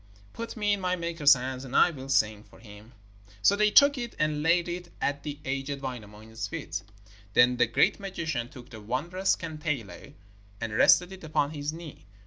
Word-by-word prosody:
Put 230 0 -7
me 205 -1 +1
in 200 - -2
my 180 0 0
maker's 165 -5 +4
hands, 130 +1 -5
and 130 -1 -7
I 175 - +6
will 135 -3 -9
sing 110 -6 +2
for - - -19
him.' 105 +1 -14 0.5
So 200 - +5
they 210 +1 +3
took 280 +5 +6
it 240 -1 -5
and 155 -1 0
laid 170 +2 +2
it 175 0 -6
at 140 0 -1
the 150 -1 -6
aged 135 +1 -3
Wainamoinen's 110 -3 -7
feet. 100 - -5 0.5
Then 125 +1 +5
the 120 - +3
great 120 - +2
magician 165 -11 -4
took 125 -1 -13
the 110 -2 -10
wondrous 170 - -1
kantele 150 - -5 0.4
and 115 -2 -4
rested 180 - +5
it 190 -2 -11
upon 155 -2 0
his 145 -1 -4
knee. 160 -9 -11
145 Hz, 185 wpm, -28 LUFS, 120-175 Hz, 0.5 s, I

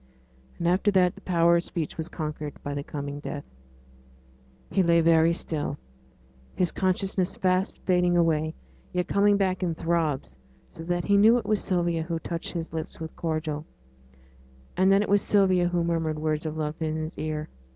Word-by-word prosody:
And 170 - -1
after 185 +4 +3
that 185 -3 +3
the - - -15
power 170 -1 +3
of 170 - -1
speech 165 -4 -4
was 160 +1 -4
conquered 150 -3 -5
by 145 - -3
the 140 - -3
coming 145 -1 -5
death. 145 -1 -5 1.3
He 195 - +3
lay 170 -1 +4
very 165 0 +5
still, 150 -4 -3 0.8
his 180 -2 +1
consciousness 185 -1 0
fast 185 +1 +1
fading 180 -1 +3
away, 160 -2 +1 0.4
yet 180 0 0
coming 200 0 +3
back 190 -2 0
in 170 -3 -1
throbs, 160 - -1 0.3
so - - -11
that 175 0 -1
he 200 0 +4
knew 220 +4 +6
it 240 - -3
was 215 -1 0
Sylvia 175 -3 0
who 165 +1 -2
touched 165 +1 -5
his 165 -2 -5
lips 160 -1 -5
with 160 0 -7
cordial, 155 -2 -2 1.1
and 190 +1 +4
that 195 +1 +5
it - - -4
was 205 0 +4
Sylvia 185 -3 +3
who 175 -1 0
murmured 165 -2 -1
words 155 0 -1
of 155 0 -5
love 155 +1 -3
in 155 -1 -1
his 155 +1 -5
ear. 155 -1 -3
170 Hz, 180 wpm, -26 LUFS, 155-185 Hz, 1.3 s, knew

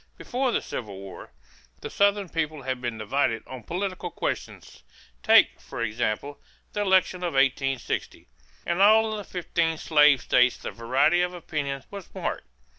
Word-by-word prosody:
Before 255 +1 -1
the - - 0
Civil 105 -5 -6
War, 95 -1 -10 0.5
the - - -6
Southern 200 -1 +2
people 155 -3 -3
had 130 -1 -3
been 120 -2 -3
divided 115 +1 0
on 130 -1 -9
political 185 - -4
questions. - - -5 0.4
Take, - - +5
for 115 - -5
example, 115 +5 -2 0.3
the 205 - -1
election 190 -2 +3
of 180 -2 -3
1860. 135 -1 0 0.4
In 170 +2 0
all 220 +2 +5
the 210 - -5
fifteen 170 -3 -1
slave 150 -4 +4
states 125 0 +3
the - - -6
variety 135 +9 +2
of 180 0 -1
opinion 140 -5 -4
was 200 -3 -9
marked. - - -4
155 Hz, 150 wpm, -26 LUFS, 125-185 Hz, 0.5 s, Take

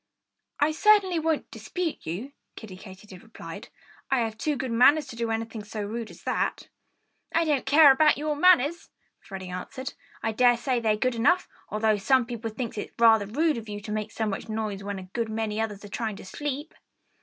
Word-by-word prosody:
"I 290 +2 +3
certainly 380 0 +4
won't 320 -1 -1
dispute 355 - -4
you," 200 - -4 0.2
Kiddie 210 -5 -9
Katydid 190 -1 -12
replied. 225 0 -10 0.4
"I 265 -2 +2
have 225 -1 -2
too 295 +7 -1
good 260 -2 -4
manners 280 +6 +5
to - - -8
do 230 0 -2
anything 225 -1 -3
so 215 0 -5
rude 225 +2 -5
as - - -14
that." - - -2 0.7
"I 335 - +4
don't 290 -4 0
care 290 +1 +8
about 300 +3 +4
your 300 +1 -1
manners," 335 -1 +4 0.3
Freddie 190 -2 -8
answered. 260 +9 -6 0.3
"I 225 - +1
dare 245 +2 +4
say 250 0 0
they're 220 -2 +1
good 255 +3 +1
enough, 285 +11 +2 0.2
although 215 0 +1
some 255 +5 +3
people 230 -1 -5
think 225 -1 -5
it's - - -6
rather 225 -3 +5
rude 300 +7 +1
of 220 -1 -11
you 205 0 -5
to 210 +1 -8
make 215 0 -2
so 220 - -2
much 210 +1 -4
noise 215 -2 -3
when 200 0 -4
a 190 - -7
good 220 +5 -4
many 220 0 -2
others 210 -2 -4
are - - -10
trying 220 0 -3
to - - -11
sleep." 290 +7 -5
230 Hz, 200 wpm, -26 LUFS, 215-285 Hz, 0.7 s, care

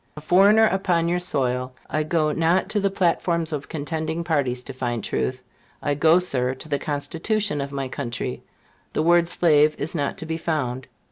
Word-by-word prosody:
A - - -4
foreigner 200 +8 +5
upon 180 -5 +1
your 175 +1 +1
soil, 130 -6 -1
I 155 - -1
go 155 0 +1
not 165 +4 +1
to 210 - +1
the 200 0 +1
platforms 170 -3 0
of 145 -1 -5
contending 160 +2 -3
parties 135 -7 0
to 135 - -8
find 120 -4 -3
truth. 130 0 -2 0.4
I 145 - -1
go, 160 +4 +4
Sir, 130 -8 0
to 135 - -9
the 145 -2 -1
Constitution 165 +4 -1
of 140 0 -5
my 135 -1 -3
country: 120 -3 -4 0.5
the 155 - 0
word 170 0 +4
slave 155 -3 +4
is 150 - -2
not 145 -4 -2
to - - -5
be 160 0 -3
found. 135 -6 -2
155 Hz, 185 wpm, -23 LUFS, 140-170 Hz, 0.5 s, foreigner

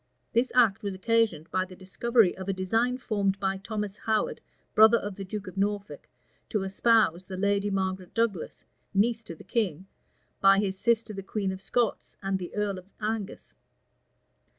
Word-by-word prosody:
This 235 +3 +2
act 230 -6 +4
was 200 -2 -3
occasioned 220 -5 +1
by 185 - +1
the 185 0 -10
discovery 205 +2 +2
of 190 +1 -6
a - - +2
design 225 +7 +1
formed 200 -5 0
by 195 -1 0
Thomas 210 0 -4
Howard, 220 -1 0 0.3
brother 220 +2 +7
of 205 -3 -5
the 195 - -6
duke 205 +2 -5
of 185 +1 -9
Norfolk, 200 -6 -2 0.4
to 210 -3 0
espouse 195 -3 +2
the 185 - -6
lady 200 +1 +1
Margaret 190 -2 -2
Douglas, 225 -7 -1 0.3
niece 225 +3 +2
to 165 - -7
the - - -13
king, 190 -7 -1 0.5
by 195 0 +6
his 195 -1 0
sister 230 -1 +1
the 195 - -5
queen 195 0 -2
of 190 0 -7
Scots 235 +3 -1
and 195 0 0
the 180 - -7
earl 205 -2 -1
of 185 +2 -17
Angus. 210 - -4
200 Hz, 175 wpm, -28 LUFS, 190-220 Hz, 0.5 s, brother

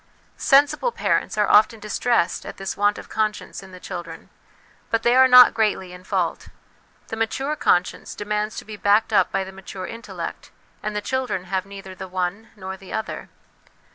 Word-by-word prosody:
Sensible 290 - +3
parents - - 0
are 210 -1 +3
often 220 +1 +5
distressed 210 -2 0
at - - -8
this 195 0 -4
want 205 0 +2
of - - -9
conscience 215 -1 -2
in 190 -1 -13
the 185 - -11
children; 175 -3 -8 0.6
but 230 - 0
they 240 +1 +4
are 260 0 +7
not 250 -1 +9
greatly 205 -5 0
in 180 0 -12
fault; - - -2 0.6
the - - -3
mature 265 +6 -1
conscience 180 -10 0
demands 210 +1 -2
to - - -6
be 215 - -8
backed 210 +2 +2
up 205 - +4
by 195 - 0
the 190 - -9
mature 190 -1 -8
intellect, 230 +3 -7 0.3
and 210 0 -4
the 210 - -1
children 255 -6 -2
have 190 0 -3
neither 195 -1 -9
the 190 0 -8
one 185 +4 -3
nor 190 -2 -6
the 190 -1 -13
other. 220 -1 -4
210 Hz, 180 wpm, -23 LUFS, 190-225 Hz, 0.6 s, not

